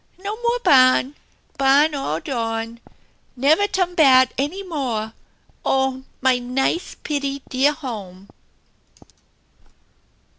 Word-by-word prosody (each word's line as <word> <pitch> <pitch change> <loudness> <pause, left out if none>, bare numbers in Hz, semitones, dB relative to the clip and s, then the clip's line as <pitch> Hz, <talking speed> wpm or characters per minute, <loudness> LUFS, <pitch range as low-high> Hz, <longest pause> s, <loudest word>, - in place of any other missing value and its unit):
No 400 +3 -5
more 475 +1 0
barn! 255 +1 +4 0.4
Barn 280 +3 +4
all 220 - -3
dawn! 230 -2 -4 0.6
Never 305 +10 +3
turn 370 -3 -1
bat 265 -6 +5
any 310 +9 -3
mohl 250 - -3 0.5
Oh, 265 -1 0 0.2
mine 250 -1 0
nice, 270 +6 -1
pitty 280 -2 -3
dear 270 +3 +3
home 205 - -8
270 Hz, 100 wpm, -21 LUFS, 250-310 Hz, 0.6 s, bat